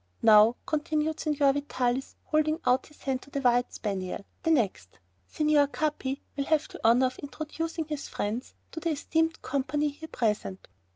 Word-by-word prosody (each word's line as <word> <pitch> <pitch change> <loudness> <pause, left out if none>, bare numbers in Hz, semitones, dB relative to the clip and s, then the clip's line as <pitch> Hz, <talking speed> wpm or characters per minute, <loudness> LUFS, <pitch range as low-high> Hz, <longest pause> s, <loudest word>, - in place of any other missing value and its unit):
"Now," 220 +1 +7
continued 310 0 -1
Signor 290 -3 +2
Vitalis, 265 -2 -1
holding 310 +1 +1
out 250 +1 +3
his 300 - -20
hand 265 -2 -1
to - - -15
the 280 - -2
white 245 -2 +2
spaniel, 195 -2 -4 0.2
"the - - 0
next. 195 - 0 0.3
Signor 300 -2 +3
Capi 290 -2 -2
will 280 0 -1
have 315 0 +2
the - - -10
honor 235 +3 +5
of 255 0 -3
introducing 315 +3 -4
his 300 -2 -5
friends 220 +5 -4 0.2
to 320 - -5
the 335 +1 -1
esteemed 320 +2 0
company 290 +2 0
here 305 +3 -9
present." 210 -4 -2
280 Hz, 165 wpm, -28 LUFS, 245-305 Hz, 0.3 s, Now